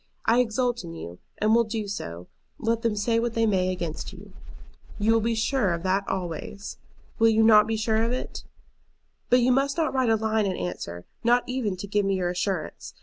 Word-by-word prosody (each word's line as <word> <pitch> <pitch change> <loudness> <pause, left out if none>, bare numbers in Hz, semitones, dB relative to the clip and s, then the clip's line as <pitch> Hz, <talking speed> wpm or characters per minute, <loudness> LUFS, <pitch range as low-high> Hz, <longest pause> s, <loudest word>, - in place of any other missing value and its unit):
I 235 - +4
exult 245 -1 0
in 165 -1 -8
you, 85 - -8 0.2
and 215 +1 +2
will 235 +1 +5
do 220 -1 -4
so, 85 - -6 0.3
let 230 0 0
them 230 -3 0
say 230 +3 +1
what 235 0 -2
they 225 0 +3
may 185 -3 +2
against 170 -4 -4
you. - - -13 0.6
You 220 +2 +3
will 225 - +3
be 230 +1 0
sure 220 -5 +1
of 165 - -7
that 195 +1 0
always. 190 +2 -5 0.4
Will 225 0 +6
you 220 0 +4
not 215 -1 +7
be 225 0 -1
sure 220 0 +1
of 230 +1 0
it? 255 - -4 0.9
"But 250 +1 +5
you 250 +1 +3
must 275 +4 +1
not 320 -3 +1
write 260 -3 +2
a 225 - +5
line 220 -1 +1
in 185 - -2
answer, 90 -1 -5 0.2
not 240 +1 +4
even 245 -7 -2
to 185 - -5
give 205 +1 +1
me 195 0 +1
your 180 -2 0
assurance. 180 -2 -3
220 Hz, 210 wpm, -26 LUFS, 185-230 Hz, 0.9 s, not